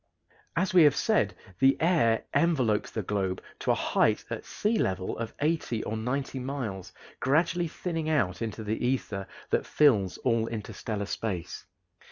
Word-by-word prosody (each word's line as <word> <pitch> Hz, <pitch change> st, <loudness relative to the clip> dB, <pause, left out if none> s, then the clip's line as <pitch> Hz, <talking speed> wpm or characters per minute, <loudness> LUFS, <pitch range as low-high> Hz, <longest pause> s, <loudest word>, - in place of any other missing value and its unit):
As 185 Hz, +4 st, +1 dB
we 180 Hz, -, +8 dB
have 150 Hz, -3 st, +6 dB
said, -, -, +2 dB, 0.2 s
the 135 Hz, 0 st, +5 dB
air 155 Hz, -10 st, +3 dB
envelopes 130 Hz, -11 st, +2 dB
the 110 Hz, -, -3 dB
globe 95 Hz, -1 st, -1 dB, 0.2 s
to -, -, -3 dB
a -, -, +5 dB
height -, -, +1 dB
at -, -, -4 dB
sea 215 Hz, +1 st, 0 dB
level 95 Hz, -, -1 dB
of 115 Hz, -1 st, -5 dB
eighty 150 Hz, -7 st, 0 dB
or 110 Hz, -, -3 dB
ninety 130 Hz, +4 st, -2 dB
miles, 125 Hz, -8 st, -4 dB, 0.3 s
gradually 165 Hz, +5 st, +2 dB
thinning 165 Hz, -1 st, -3 dB
out 100 Hz, -, +1 dB
into 110 Hz, -1 st, -4 dB
the 110 Hz, +3 st, -2 dB
ether 115 Hz, -6 st, -1 dB, 0.2 s
that -, -, +1 dB
fills 110 Hz, -11 st, +3 dB
all 115 Hz, -2 st, +2 dB
interstellar 105 Hz, -1 st, -4 dB
space. 95 Hz, -4 st, -4 dB
115 Hz, 155 wpm, -28 LUFS, 105-155 Hz, 0.3 s, we